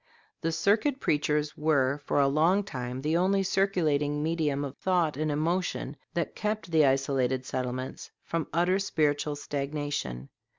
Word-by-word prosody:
The 165 - 0
circuit 215 - +2
preachers 150 0 0
were 145 -3 +2
for 145 - +1
a 140 - +5
long 165 +8 +3
time 125 -6 -5
the 155 +2 +1
only 195 +2 +2
circulating 155 -7 +1
medium 155 -3 0
of 140 0 -7
thought 175 -5 +1
and 155 +2 -1
emotion 160 -1 -1 0.2
that 170 - -2
kept 210 -5 -3
the 155 -3 +5
isolated 130 -1 +1
settlements 130 0 -4
from 165 -1 -2
utter 175 +3 +2
spiritual 150 -5 0
stagnation. 145 - -4
150 Hz, 140 wpm, -28 LUFS, 140-170 Hz, 0.2 s, a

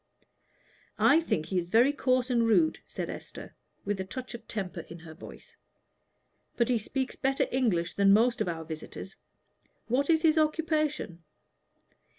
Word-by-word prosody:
"I 315 +4 +5
think 155 - -1
he 185 +2 -1
is 170 - -5
very 235 +9 +4
coarse 255 -2 +1
and 235 -2 +2
rude," 315 +8 +3
said - - -5
Esther, - - -9 0.3
with 205 -1 -2
a - - -2
touch 255 +7 -7
of 235 - -10
temper 190 -5 -4
in 170 - -9
her 160 -1 -11
voice. - - -13 1.0
"But 235 0 +2
he 240 -2 +2
speaks 265 +5 -3
better 270 0 0
English 210 -10 0
than 200 -1 +4
most 235 +4 +3
of - - 0
our 165 -2 -3
visitors. 160 +4 -8 0.7
What 270 +5 0
is 320 0 +3
his 320 -1 +4
occupation?" 305 - -1
235 Hz, 160 wpm, -29 LUFS, 190-280 Hz, 1.0 s, I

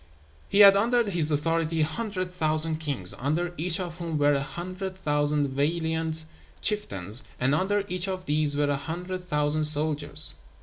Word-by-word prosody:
He 200 - +4
had 200 -1 +9
under 235 +3 +2
his 170 -6 0
authority 165 +2 0
a - - +4
hundred 185 +1 -4
thousand 155 -2 +2
kings, 140 - -1
under 165 +6 -1
each 165 +2 0
of 175 -2 -6
whom 165 -2 -3
were 145 0 +3
a 140 - 0
hundred 185 +6 -6
thousand 145 -4 +1
valiant 160 +3 -1 0.3
chieftains, 110 - -2 0.2
and 130 +3 +1
under 195 +6 +1
each 180 -1 -2
of 185 -1 -4
these 150 0 +1
were 145 - +1
a 140 - 0
hundred 180 +5 -5
thousand 150 -2 +1
soldiers. 150 -1 +2
160 Hz, 165 wpm, -26 LUFS, 150-180 Hz, 0.3 s, had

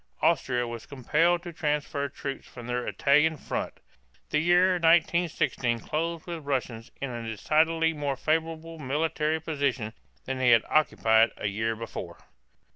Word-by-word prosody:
Austria 125 -7 +1
was 115 -1 -7
compelled 165 +6 +1
to 175 -2 -7
transfer 150 -2 -1
troops 135 +1 -6
from 120 -1 -10
her 125 0 -2
Italian 150 +3 +3
front. - - -4 0.6
The 150 - +3
year 175 +3 +4
1916 165 -7 +2
closed 165 +6 -3
with 175 -1 -4
the - - -10
Russians 130 -5 -3
in 135 -2 -3
a 120 -1 -5
decidedly 160 +9 +1
more 145 -3 -2
favorable 165 +2 -2
military 155 +2 0
position 140 -8 -2 0.3
than 135 0 -3
they 130 -1 +3
had 115 -2 +5
occupied 115 -7 +3
a - - -6
year 110 +3 -1
before. 110 -6 -7
145 Hz, 145 wpm, -27 LUFS, 120-160 Hz, 0.6 s, had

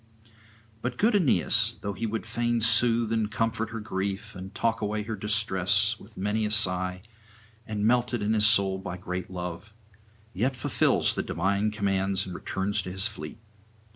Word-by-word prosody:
But 120 +1 -3
good 220 +1 +3
Aeneas, 115 - +3
though 100 0 -3
he 115 +4 -3
would 110 +1 -3
fain 120 +1 0
soothe 115 0 +4
and 110 -2 0
comfort 115 0 -1
her 115 0 -5
grief, 100 0 -4
and 95 +1 -8
talk 115 -1 0
away 105 0 -1
her 110 +1 -4
distress, 105 +1 +1
with 105 +1 -16
many 105 +3 0
a 105 - 0
sigh, 90 -3 +2 0.6
and 105 -1 -2
melted 120 -1 +2
in 110 +1 +1
soul 100 -3 +3
by 90 -2 -5
his 90 - -13
great 90 0 -4
love, 90 +3 -6 0.6
yet 125 +8 0
fulfils - - +1
the - - -1
divine 100 +3 0
commands 100 -2 0
and 90 - -7
returns 100 +3 -2
to 90 - -7
his 95 +3 +2
fleet. 95 -5 -8
105 Hz, 170 wpm, -27 LUFS, 95-115 Hz, 0.6 s, soothe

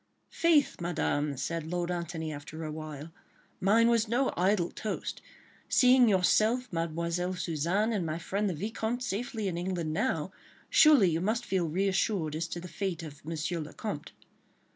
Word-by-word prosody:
"Faith, 320 - +3
Madame!" 150 -4 -1
said 165 +3 -3
Lord 175 +1 -2
Antony, 165 -2 -3
after 150 +2 -8
a 155 - -4
while, 155 0 -7 0.5
"mine 225 +5 +4
was 230 -1 +3
no 245 +4 +1
idle 185 -1 +2
toast; 215 - -4 0.5
seeing 250 -2 +6
yourself, 215 +5 +2
Mademoiselle 170 +2 -1
Suzanne 180 +6 0
and 200 -5 0
my 160 -1 -2
friend 200 +4 -1
the 180 - -2
Vicomte 220 +6 -3
safely 220 -1 -3
in 170 -2 -2
England 175 -3 -2
now, 220 +10 -1 0.4
surely 285 - +6
you 165 +1 0
must 225 +5 0
feel 180 -4 0
reassured 190 -2 0
as 165 +1 -2
to 175 - -5
the 180 - -8
fate 185 -2 -3
of 145 -3 -10
Monsieur 165 +2 -3
le 150 -1 -7
Comte." - - -5
180 Hz, 160 wpm, -30 LUFS, 165-215 Hz, 0.5 s, seeing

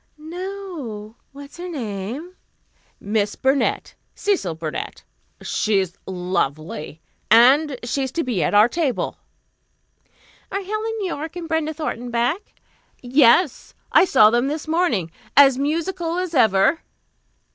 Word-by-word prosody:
"No. 320 - -7 0.2
What's 280 +2 -12
her 360 +1 -6
name?" 250 - -5 0.6
"Miss 205 0 -1
Burnett 270 +1 0 0.2
Cecil 355 - -1
Burnett. 160 -1 -6 0.4
She's 195 -4 0
lovely. 160 -4 -3 0.3
And 260 +6 +5
she's 265 +2 -2
to 335 - -1
be 235 -8 -1
at 155 - +1
our 210 +2 +7
table." 280 -1 -2 1.3
"Are 395 +1 -2
Helen 430 +3 -3
Yorke 325 -4 -4
and 345 -2 -6
Brenda 320 -1 -1
Thornton 245 -6 -4
back?" 245 - -1 0.5
"Yes. 260 +3 +3 0.2
I - - +6
saw 215 - +6
them 240 +3 +2
this 300 +2 -4
morning. 310 - 0 0.3
As 275 -2 +7
musical 330 +3 -1
as 365 -2 -3
ever. 220 - +3
275 Hz, 115 wpm, -22 LUFS, 215-335 Hz, 1.3 s, our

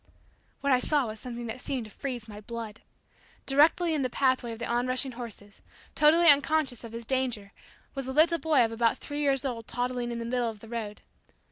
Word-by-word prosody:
What 280 -1 +3
I 250 - +4
saw 290 +1 +2
was 220 -1 -6
something 240 0 -6
that 235 +2 -6
seemed 255 -4 -3
to 215 - -12
freeze 245 -1 -5
my 210 -1 -9
blood! 230 -1 -7 0.7
Directly 315 +4 +4
in 300 - 0
the 255 - 0
pathway 255 -2 +1
of 225 - -6
the 230 - -4
onrushing 255 +2 0
horses, 225 -4 -10 0.3
totally 325 +3 +5
unconscious 285 -3 +4
of 230 - -8
his 230 0 -6
danger, 245 -6 -1 0.4
was 270 -2 -5
a - - -2
little 325 +4 +4
boy 295 -5 +4
of 225 - -4
about 230 0 +1
three 290 0 -6
years 275 -1 +2
old 235 -3 -4
toddling 245 0 -2
along 240 - -3
in - - -4
the 230 - -4
middle 240 0 0
of 220 -2 -9
the 225 - -13
road. 220 -3 -5
245 Hz, 215 wpm, -28 LUFS, 230-275 Hz, 0.7 s, totally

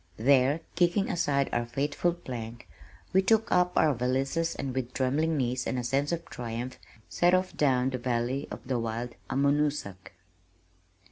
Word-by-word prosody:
There, 135 +5 +3
kicking 175 +3 +2
aside 140 -5 +1
our 120 0 0
faithful 145 +7 0
plank, 120 -7 -7 0.5
we 190 - +5
took 220 +3 +2
up 180 0 +2
our 155 -2 +4
valises 135 +7 0
and 135 -2 -4
with 125 -1 -3
trembling 145 +5 +1
knees 125 -1 -1
and 130 - -1
a 125 - -2
sense 135 +5 0
of 170 -1 -3
triumph 120 +1 -6 0.3
set 175 +1 +3
off 185 0 -1
down 130 -3 +2
the 130 - -3
valley 125 +3 -1
of - - -7
the 130 -2 0
wild 115 +1 -3 0.2
Amonoosuc. 140 -9 0
135 Hz, 155 wpm, -28 LUFS, 125-160 Hz, 0.5 s, we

